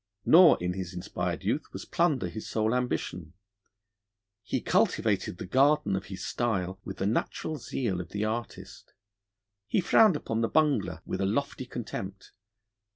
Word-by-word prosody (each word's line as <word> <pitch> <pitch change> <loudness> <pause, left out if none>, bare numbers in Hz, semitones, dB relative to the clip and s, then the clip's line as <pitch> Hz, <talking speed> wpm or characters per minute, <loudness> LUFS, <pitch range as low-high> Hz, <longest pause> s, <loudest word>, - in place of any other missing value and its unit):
Nor 175 +1 +8
in 90 0 -1
his 90 -1 -6
inspired 90 - -3
youth - - -1
was - - -7
plunder 165 -7 +1
his 110 - -7
sole 110 +1 +1
ambition: 90 -9 -2 1.1
he 100 - -2
cultivated 100 -4 +1
the - - -6
garden 135 0 +3
of 95 0 -3
his 95 0 -7
style 95 -6 -1
with 95 - -7
the 95 - -2
natural 135 +8 -1
zeal 115 -8 -2
of 85 - -10
the 105 +1 -2
artist; 110 -4 -6 0.7
he - - +1
frowned 190 +1 +5
upon 115 -6 -2
the 115 - +1
bungler 105 - +1
with - - -3
a 95 - +1
lofty 130 +3 -2
contempt. 100 -5 -6
110 Hz, 155 wpm, -28 LUFS, 95-130 Hz, 1.1 s, Nor